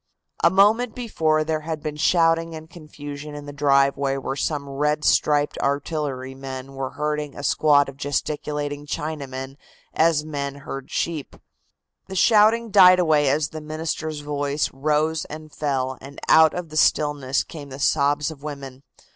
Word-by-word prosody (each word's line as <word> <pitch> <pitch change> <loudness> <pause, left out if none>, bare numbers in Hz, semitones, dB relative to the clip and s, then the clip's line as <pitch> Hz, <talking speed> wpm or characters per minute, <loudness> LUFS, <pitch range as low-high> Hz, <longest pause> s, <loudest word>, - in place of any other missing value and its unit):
A 170 - +7
moment 210 +5 +3
before 160 -10 0
there 155 0 -1
had 155 -1 -5
been 155 -1 -4
shouting 165 +1 +2
and 160 0 -9
confusion 150 -3 -9
in 145 0 -8
the 145 - -8
driveway 140 -1 +2
where 135 0 -4
some 145 0 -2
red 150 +2 -1
striped 145 -1 +2
artillerymen 135 -2 -3
were 135 -1 -5
herding 150 -1 -3
a 145 - -7
squad 145 -1 +3
of 135 -1 -10
gesticulating 145 +1 -3
Chinamen 140 -3 -5 0.4
as 160 -2 +2
men 140 -2 -4
herd 135 -1 -8
sheep. 160 -4 -3 0.7
The 190 - -7
shouting 220 +3 +4
died 185 -2 +8
away 155 -5 +3
as 145 +2 +1
the 155 - -7
minister's 155 0 -4
voice 145 0 -2
rose 155 +3 0
and 155 0 -10
fell 130 -3 -2
and 140 +1 -10
out 160 -1 +6
of 180 -2 -5
the 155 - -6
stillness 145 -4 +2
came 145 -3 -10
the 130 - -8
sobs 145 +1 +1
of 145 -3 -12
women. 140 -3 -8
150 Hz, 155 wpm, -23 LUFS, 140-155 Hz, 0.7 s, died